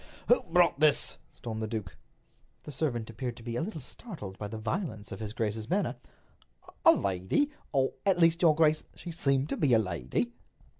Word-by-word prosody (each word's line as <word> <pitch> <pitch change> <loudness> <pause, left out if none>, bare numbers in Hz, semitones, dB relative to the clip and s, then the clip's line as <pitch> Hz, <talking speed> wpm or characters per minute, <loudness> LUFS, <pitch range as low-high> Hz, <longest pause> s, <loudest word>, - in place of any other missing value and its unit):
"Who 245 - +6
brought 175 -3 +3
this?" 150 -2 +3
stormed 110 -2 -6
the 110 - -1
duke. 105 -8 -5 0.7
The - - -8
servant 120 -7 -2
appeared 120 +1 -4
to 115 - -11
be 120 0 -4
a - - 0
little 175 -1 -4
startled 130 - -8
by 105 - -3
the 110 +2 -6
violence 110 - -3
of 95 - -6
his 110 -2 -4
grace's 110 -1 -2
manner. - - +1 0.9
"A - - +9
lady—or, 130 - 0
at 195 -2 +3
least, 165 -1 +4
your 160 -4 +6
grace, 155 -1 +3
she 175 - -7
seemed 140 -3 +1
to - - -2
be 140 -5 +3
a - - +7
lady." 90 - -1
125 Hz, 185 wpm, -30 LUFS, 110-165 Hz, 0.9 s, A